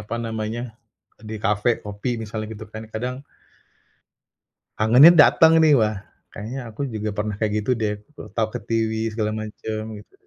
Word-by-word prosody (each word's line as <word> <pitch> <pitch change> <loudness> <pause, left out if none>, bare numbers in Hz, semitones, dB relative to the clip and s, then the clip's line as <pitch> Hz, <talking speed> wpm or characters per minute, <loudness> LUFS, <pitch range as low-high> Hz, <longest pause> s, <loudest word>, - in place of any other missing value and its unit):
apa 105 +3 -5
namanya, 110 +1 -4 0.5
di 110 0 -7
kafe 105 +2 +1
kopi 105 +4 -3
misalnya 110 0 -5
gitu 110 +1 -9
kan, 110 +1 -7
kadang 125 +4 -4 1.5
kangennya 125 +9 +8
datang 160 +2 +6
nih, 160 -1 +5
"Wah, 110 0 +1 0.4
kayaknya 115 +6 -6
aku 110 +4 -8
juga 110 0 -3
pernah 105 0 -2
kayak 110 -2 0
gitu 105 - -7
deh, 105 -1 +1
aku 105 - -24 0.2
ketawa-ketiwi 110 +1 -2
segala 110 -1 -1
macam." 110 0 -5 0.2
Gitu. 105 - -18
110 Hz, 145 wpm, -23 LUFS, 105-115 Hz, 1.5 s, kangennya